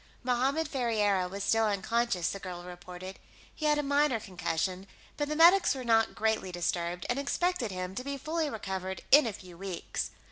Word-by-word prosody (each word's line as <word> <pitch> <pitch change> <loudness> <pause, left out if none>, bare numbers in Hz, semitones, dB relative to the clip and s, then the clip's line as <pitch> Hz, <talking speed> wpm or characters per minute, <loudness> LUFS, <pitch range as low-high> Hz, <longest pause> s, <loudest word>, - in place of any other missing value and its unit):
Mohammed 265 +6 +1
Ferriera 210 -9 +1
was 200 +1 -5
still 225 +1 +3
unconscious, 210 -1 0
the 195 - -5
girl 180 -2 -7
reported; 180 +1 -9 0.3
he 310 - -2
had 300 0 +4
a 295 - 0
minor 285 -3 +2
concussion, 185 0 -3 0.3
but 290 0 -2
the 305 - -1
medics 345 +1 +6
were 260 - -5
not 225 -2 +3
greatly 220 -4 0
disturbed, 175 0 -2
and 245 +3 0
expected 290 -3 0
him 185 -1 -4
to 250 - -4
be 280 +1 -4
fully 315 +2 -1
recovered 190 -5 -4
in 290 -3 +8
a 220 - -3
few 180 -3 -12
weeks. 190 -3 -4
220 Hz, 180 wpm, -30 LUFS, 185-280 Hz, 0.3 s, in